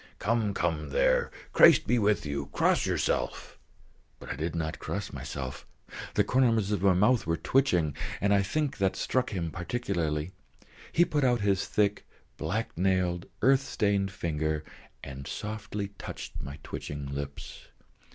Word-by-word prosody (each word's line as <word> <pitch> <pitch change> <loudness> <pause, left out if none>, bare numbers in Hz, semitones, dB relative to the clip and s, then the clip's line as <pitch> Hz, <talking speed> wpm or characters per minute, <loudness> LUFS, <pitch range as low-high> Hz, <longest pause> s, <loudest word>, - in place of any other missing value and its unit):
"Come, 110 -3 0
come, 80 -4 -1
there; - - +3 0.2
Christ - - +7
be 120 +1 +2
with 105 -5 +2
you! 70 -1 -3
Cross - - +2
yourself!" - - -1 0.6
But - - -8
I - - -2
did 80 +2 -3
not 80 -1 -3
cross - - -4
myself. 65 -2 -6 0.5
The - - +4
corners 115 -6 +2
of 100 -4 0
my 95 -2 +4
mouth 110 +2 +3
were 85 0 +1
twitching, 90 - +2 0.2
and 100 0 +2
I 100 - +4
think 140 +6 -1
that 95 -1 +2
struck 130 -1 0
him 85 -5 -3
particularly. 85 -5 -2 0.6
He 175 - +4
put 145 -4 0
out 120 -3 +3
his 100 -1 +1
thick, 105 -1 +1 0.3
black - - -3
nailed, 90 -1 +1 0.2
earth 135 +1 +5
stained 100 -6 0
finger 80 -5 -2 0.4
and 70 0 -7
softly 105 -1 -4
touched - - -7
my 70 +1 -7
twitching 70 -1 -6
lips. 70 0 -7
95 Hz, 150 wpm, -29 LUFS, 80-110 Hz, 0.6 s, Christ